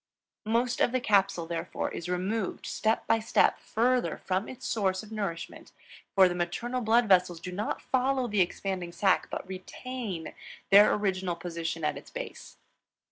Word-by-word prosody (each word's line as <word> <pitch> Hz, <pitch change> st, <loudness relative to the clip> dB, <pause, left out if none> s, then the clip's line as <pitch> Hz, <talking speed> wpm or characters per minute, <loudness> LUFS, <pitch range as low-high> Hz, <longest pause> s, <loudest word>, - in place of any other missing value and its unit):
Most 235 Hz, +2 st, +1 dB
of -, -, +4 dB
the 255 Hz, -, +1 dB
capsule, 195 Hz, -6 st, +2 dB
therefore, 165 Hz, 0 st, -3 dB
is 170 Hz, -, -6 dB
removed 190 Hz, +3 st, -2 dB
step 220 Hz, 0 st, 0 dB
by 225 Hz, 0 st, +3 dB
step 225 Hz, -, +3 dB
farther 245 Hz, +2 st, +1 dB
from 190 Hz, +2 st, -2 dB
its 255 Hz, 0 st, -9 dB
source 195 Hz, -5 st, 0 dB
of 215 Hz, -, -13 dB
nourishment, 195 Hz, -6 st, -5 dB, 0.4 s
for 190 Hz, -1 st, +7 dB
the 180 Hz, -, -1 dB
maternal 205 Hz, +9 st, -2 dB
blood 230 Hz, +1 st, +4 dB
vessels 180 Hz, -3 st, +4 dB
do 180 Hz, +2 st, -6 dB
not 205 Hz, +4 st, -3 dB
follow 260 Hz, -1 st, +1 dB
the 205 Hz, -3 st, +2 dB
expanding 180 Hz, 0 st, -2 dB
sac 190 Hz, +1 st, +2 dB
but -, -, -5 dB
retain 190 Hz, -1 st, -6 dB, 0.4 s
their 205 Hz, +2 st, +8 dB
original 190 Hz, -3 st, 0 dB
position 165 Hz, -1 st, -4 dB
at 150 Hz, -, 0 dB
its -, -, -16 dB
base. -, -, -8 dB
195 Hz, 160 wpm, -29 LUFS, 180-230 Hz, 0.4 s, their